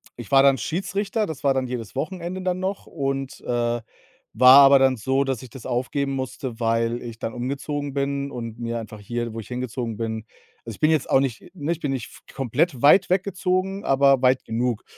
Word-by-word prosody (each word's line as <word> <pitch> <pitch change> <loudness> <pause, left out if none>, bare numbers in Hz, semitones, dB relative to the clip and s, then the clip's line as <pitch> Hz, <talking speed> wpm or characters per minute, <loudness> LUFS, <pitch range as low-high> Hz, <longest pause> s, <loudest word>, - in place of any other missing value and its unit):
ich 120 -1 -10
war 135 0 +7
dann 135 -1 +5
Schiedsrichter, 195 - -2
das 155 -3 -7
war 140 -1 +3
dann 130 -1 -1
jedes 120 -2 -6
Wochenende 180 +4 -4
dann 185 0 -1
noch 195 +1 -4
und, 135 -3 -3
äh, 120 -1 -1 0.5
war 130 +4 +8
aber 140 0 +7
dann 130 -2 +3
so, 135 +5 +1
dass 135 -2 -2
ich 125 - -11
das 130 - -11
aufgeben 135 +3 -1
musste, 130 -2 -5
weil 115 +1 0
ich 115 -1 -8
dann 115 - -4
umgezogen 140 +3 -4
bin 140 0 -2
und 115 -1 -7
mir 115 0 -3
einfach 110 -1 -9
hier, 120 +2 -4
wo - - -4
ich 110 - -9
hingezogen 125 -2 -4
bin 110 -1 -4 0.4
Also, 115 -3 -7
ich - - -21
bin 155 - +3
jetzt 155 -4 +1
auch 135 - +5
nicht 135 +4 -3
ne, 155 0 -2
ich 170 - -2
bin 145 -4 -2
nicht 130 -4 -3
f - - -16
komplett 135 +2 0
weit 180 +7 +6
weggezogen, 190 +1 0
aber 135 -1 +4
weit 130 0 +3
genug. 120 0 -1
135 Hz, 210 wpm, -23 LUFS, 120-145 Hz, 0.5 s, war